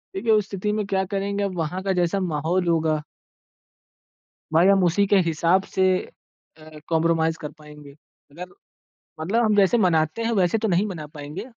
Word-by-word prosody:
देखिए, 235 -11 0
उस 210 -2 +2
स्थिति 200 +1 -3
में 210 -1 -1
क्या 190 -1 0
करेंगे, 200 +1 -2
अब 190 -2 -3
वहाँ 170 +3 -3
का 195 - -1
जैसा 180 +2 0
माहौल 170 +5 -1
होगा 160 -2 +1 1.5
भाई 170 +3 +5
हम 195 -1 +4
उसी 180 +4 +2
के 200 - +4
हिसाब 170 +4 +2
से 190 - +2 0.7
अ, 155 -1 -13
कॉम्प्रोमाइज़ 165 0 +1
कर 150 -1 -6
पाएँगे। 150 -2 -14 0.4
अगर 175 +5 -8 0.8
मतलब 215 +9 +1
हम 215 -1 +2
जैसे 200 +4 +4
मनाते 165 +1 +1
हैं 235 - 0
वैसे 190 0 +2
तो 220 0 -1
नहीं 185 +3 +1
मना 165 -7 -6
पाएँगे। 150 +8 -7
180 Hz, 170 wpm, -23 LUFS, 160-200 Hz, 1.5 s, भाई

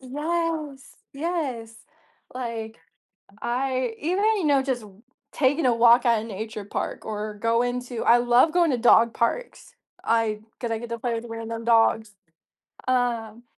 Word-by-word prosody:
Yes, 300 +1 -3 0.2
yes, 275 -8 -3 0.6
like 230 -3 -5 0.6
I, 255 -1 -1
even, 365 +7 0
you 365 - -2
know 280 -3 +3
just 255 -4 -2 0.5
taking 285 +2 +1
a 245 - +3
walk 235 +2 +5
at 230 -3 +3
a - - -7
nature 215 0 -6
park 205 - -4
or 215 0 -4
going 230 +3 0
to 245 -2 -5
I 240 - +6
love 245 +5 +4
going 345 -2 +3
to 255 - 0
dog 235 0 +5
parks, - - -3 0.3
I 225 -2 +1 0.2
'cause 235 - -3
I 225 - -1
get 240 +1 -8
to 235 - -3
play 235 0 -2
with 230 +1 -5
random 230 0 -6
dogs, 225 -2 +3 0.7
um. 240 -3 -1
240 Hz, 150 wpm, -24 LUFS, 225-270 Hz, 0.7 s, I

